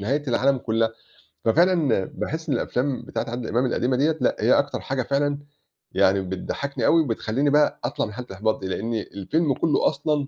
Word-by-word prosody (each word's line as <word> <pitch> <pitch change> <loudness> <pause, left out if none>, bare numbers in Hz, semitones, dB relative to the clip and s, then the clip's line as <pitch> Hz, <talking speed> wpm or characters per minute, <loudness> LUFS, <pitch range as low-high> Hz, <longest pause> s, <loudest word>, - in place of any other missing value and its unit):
نهاية 135 +9 0
العالم 130 +2 +2
كلّها، 115 -1 0 0.6
ففعلًا 150 - +3
باحس 160 +1 -5
إن 135 - +2
الأفلام 130 +3 -1
بتاعة - - -3
عادل 120 0 -4
إمام 125 +3 +1
القديمة 125 +1 0
ديّة، 155 +3 +2
لأ، - - +2
هي - - +4
أكتر - - -1
حاجة 130 -1 -2
فعلًا 140 +1 0 0.5
يعني 95 +1 +3
بتضحّكني 95 +9 -3
أوي، 165 - +5
وبتخلّيني 130 +1 0
بقى 150 +1 +3
أطلّع 120 - -1
من 105 - -8
حالة 125 +2 -7
الإحباط 105 +3 -1
دي، 95 - -3
لأن 115 +5 -3
الفيلم 120 - -1
كلّه 155 +3 +2
أصلًا 145 -1 -1
130 Hz, 180 wpm, -24 LUFS, 115-145 Hz, 0.6 s, أوي